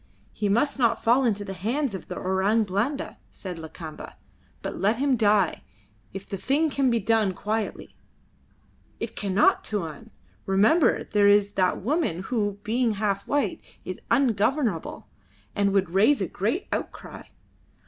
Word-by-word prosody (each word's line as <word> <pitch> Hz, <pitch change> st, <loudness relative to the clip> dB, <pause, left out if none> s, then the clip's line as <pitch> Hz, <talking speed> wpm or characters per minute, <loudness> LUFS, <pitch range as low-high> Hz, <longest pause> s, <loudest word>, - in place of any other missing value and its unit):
"He 205 Hz, -1 st, -1 dB
must 240 Hz, +7 st, +1 dB
not 235 Hz, -2 st, +2 dB
fall 245 Hz, +4 st, +4 dB
into 205 Hz, -3 st, 0 dB
the 195 Hz, -, -5 dB
hands 235 Hz, -, -2 dB
of 190 Hz, -, -7 dB
the -, -, -6 dB
Orang 190 Hz, +4 st, +1 dB
Blanda," 215 Hz, +9 st, -2 dB
said 180 Hz, -4 st, -8 dB
Lakamba; 160 Hz, 0 st, -9 dB, 0.5 s
"but -, -, -5 dB
let 205 Hz, +4 st, +2 dB
him 275 Hz, 0 st, +2 dB
die, 205 Hz, -5 st, +2 dB, 0.5 s
if 195 Hz, +1 st, -8 dB
the 195 Hz, -, -4 dB
thing 290 Hz, -, +1 dB
can 275 Hz, -1 st, +2 dB
be 235 Hz, -1 st, +2 dB
done 215 Hz, -2 st, +1 dB
quietly." 215 Hz, +3 st, -4 dB, 1.0 s
"It -, -, -5 dB
cannot, 200 Hz, -1 st, +2 dB
Tuan! 205 Hz, +1 st, -5 dB, 0.4 s
Remember 215 Hz, -, +3 dB
there 205 Hz, -1 st, +2 dB
is 205 Hz, 0 st, +4 dB
that 185 Hz, -2 st, 0 dB
woman 260 Hz, -, 0 dB
who, 205 Hz, -4 st, 0 dB
being 235 Hz, +1 st, +1 dB
half 200 Hz, -1 st, -2 dB
white, 290 Hz, 0 st, 0 dB, 0.2 s
is -, -, -6 dB
ungovernable, 230 Hz, -, 0 dB, 0.5 s
and 200 Hz, -1 st, +2 dB
would 195 Hz, -3 st, +1 dB
raise 215 Hz, +10 st, +4 dB
a 190 Hz, -, -1 dB
great 220 Hz, -, -2 dB
outcry. -, -, -5 dB
210 Hz, 150 wpm, -25 LUFS, 195-240 Hz, 1.0 s, fall